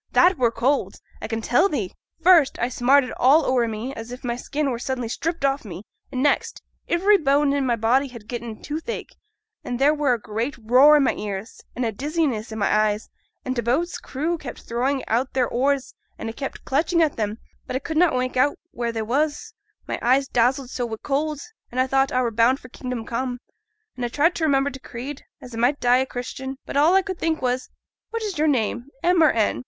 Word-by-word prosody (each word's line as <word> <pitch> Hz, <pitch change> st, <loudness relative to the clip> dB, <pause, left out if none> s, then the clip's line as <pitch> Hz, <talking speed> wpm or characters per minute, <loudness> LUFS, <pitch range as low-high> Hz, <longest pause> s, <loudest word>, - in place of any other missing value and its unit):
That 355 Hz, -2 st, +5 dB
were 240 Hz, -2 st, +4 dB
cold, 260 Hz, +5 st, 0 dB, 0.3 s
a -, -, -4 dB
can 225 Hz, 0 st, -3 dB
tell 345 Hz, -, +3 dB
the'! 220 Hz, -, -2 dB, 0.3 s
First, 335 Hz, -6 st, +6 dB
I 240 Hz, -, 0 dB
smarted 255 Hz, +2 st, +3 dB
all 285 Hz, +6 st, +5 dB
ower 245 Hz, -2 st, +2 dB
me, 225 Hz, +4 st, -4 dB
as 225 Hz, -1 st, -8 dB
if 250 Hz, -, -8 dB
my 240 Hz, -1 st, -1 dB
skin 280 Hz, +3 st, -2 dB
were 235 Hz, -, -3 dB
suddenly 250 Hz, -1 st, -3 dB
stript 325 Hz, +5 st, -2 dB
off 275 Hz, +1 st, +1 dB
me: 190 Hz, -3 st, -8 dB, 0.3 s
and 255 Hz, 0 st, -1 dB
next, 290 Hz, -, +1 dB, 0.3 s
ivery 390 Hz, +4 st, +4 dB
bone 285 Hz, -1 st, +3 dB
i' 285 Hz, -, +1 dB
my 255 Hz, -3 st, +1 dB
body 240 Hz, +5 st, +2 dB
had 235 Hz, -5 st, -12 dB
getten 235 Hz, -2 st, -5 dB
t' -, -, -21 dB
toothache, 320 Hz, +10 st, -5 dB, 0.5 s
and 245 Hz, -, -3 dB
there 280 Hz, +4 st, +4 dB
were 290 Hz, -4 st, +2 dB
a 235 Hz, -, -1 dB
great 225 Hz, +6 st, -3 dB
roar 255 Hz, +7 st, +6 dB
i' -, -, +5 dB
my 275 Hz, -, +2 dB
ears, 205 Hz, +1 st, -6 dB
an' 250 Hz, -, -2 dB
a 230 Hz, -, 0 dB
great 200 Hz, -, -19 dB
dizziness 285 Hz, -7 st, -1 dB
i' -, -, -5 dB
my 210 Hz, -, 0 dB
eyes; 215 Hz, 0 st, +1 dB, 0.4 s
an' 255 Hz, -, -1 dB
t' 240 Hz, -, -1 dB
boat's 280 Hz, +10 st, 0 dB
crew 315 Hz, +5 st, -3 dB
kept 270 Hz, -, -8 dB
throwin' 260 Hz, +4 st, 0 dB
out 245 Hz, +4 st, 0 dB
their 255 Hz, -2 st, +2 dB
oars, 270 Hz, +2 st, 0 dB, 0.2 s
an' 225 Hz, -, -5 dB
a -, -, -6 dB
kept 270 Hz, +3 st, -6 dB
clutchin' 325 Hz, +5 st, +1 dB
at 310 Hz, -7 st, +2 dB
'em, 210 Hz, 0 st, -1 dB, 0.3 s
but -, -, -4 dB
a -, -, +1 dB
could 320 Hz, +3 st, -5 dB
na' 345 Hz, +2 st, +5 dB
make 255 Hz, 0 st, -2 dB
out 270 Hz, +3 st, +2 dB
where 235 Hz, -1 st, -2 dB
they 225 Hz, -1 st, -3 dB
was, 290 Hz, +7 st, -1 dB, 0.3 s
my -, -, -3 dB
eyes 265 Hz, +3 st, +3 dB
dazzled 250 Hz, +2 st, +1 dB
so 245 Hz, -, -3 dB
wi' 230 Hz, -2 st, -3 dB
t' -, -, -21 dB
cold, 295 Hz, +1 st, -1 dB, 0.3 s
an' 245 Hz, -, -8 dB
I 255 Hz, -, +4 dB
thought 270 Hz, +1 st, +2 dB
I 255 Hz, 0 st, +1 dB
were 235 Hz, -, 0 dB
bound 235 Hz, +4 st, +3 dB
for 255 Hz, -, -13 dB
"kingdom 250 Hz, -3 st, -5 dB
come," 245 Hz, +2 st, -3 dB, 0.6 s
an' 250 Hz, -, -5 dB
a 240 Hz, -, -1 dB
tried 310 Hz, +8 st, +2 dB
to 330 Hz, -, -2 dB
remember 280 Hz, -1 st, +2 dB
t' 265 Hz, -, -9 dB
Creed, 260 Hz, +4 st, -8 dB, 0.2 s
as 250 Hz, -1 st, -10 dB
a -, -, -6 dB
might 255 Hz, +5 st, +2 dB
die 245 Hz, 0 st, +4 dB
a 260 Hz, +1 st, 0 dB
Christian. 265 Hz, +2 st, -6 dB
But -, -, -7 dB
all 310 Hz, +6 st, +5 dB
a 385 Hz, -, +4 dB
could 375 Hz, -2 st, -5 dB
think 325 Hz, -1 st, 0 dB
on -, -, -16 dB
was, 250 Hz, +1 st, -1 dB, 0.4 s
"What 460 Hz, -1 st, -4 dB
is 400 Hz, -7 st, -3 dB
your 310 Hz, -, +3 dB
name, 240 Hz, -2 st, 0 dB, 0.2 s
M 355 Hz, -1 st, +4 dB
or 315 Hz, -, +7 dB
N?" 220 Hz, -2 st, +1 dB
260 Hz, 235 wpm, -23 LUFS, 235-290 Hz, 0.6 s, or